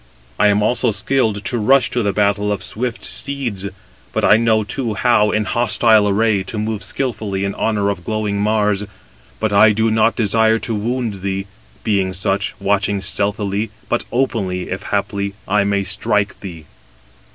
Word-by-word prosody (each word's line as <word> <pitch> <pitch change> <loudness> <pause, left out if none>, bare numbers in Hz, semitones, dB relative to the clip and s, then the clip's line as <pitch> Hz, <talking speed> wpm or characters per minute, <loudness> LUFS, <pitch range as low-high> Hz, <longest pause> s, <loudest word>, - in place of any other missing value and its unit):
I 105 - +5
am 105 0 +3
also 115 +1 +2
skilled 110 0 0
to 120 -1 0
rush 130 +5 +3
to 125 - 0
the 100 -2 +1
battle 105 +1 +1
of 100 -2 -3
swift 120 +4 -4
steeds. 125 -9 -3 0.5
I - - +5
know 110 -1 +2
too, 115 0 -3
how, 105 -2 +3
in 105 0 0
hostile 110 -3 +3
array, 105 0 +2
to 95 +3 -6
move 105 0 -3
skilfully 110 -7 -2
in 100 - -2
honour 105 -2 0
of 100 -3 -6
glowing 105 -1 -2
Mars. 105 -1 +1 0.6
But 110 -2 -1
I 105 +1 +6
do 110 +1 +1
not 110 +1 +3
desire 110 0 +3
to 115 - -3
wound 110 -2 -2
thee, 95 0 -2 0.4
being 100 -4 0
such, 95 +2 -1
watching 100 0 +1
stealthily, 100 +2 -1 0.2
but 120 - 0
openly, 100 -9 -1
if 95 +1 -3
haply 100 -1 -2
I 100 +1 +2
may 100 0 +1
strike 100 +1 -1
thee." 85 -5 -9
105 Hz, 165 wpm, -18 LUFS, 100-110 Hz, 0.6 s, I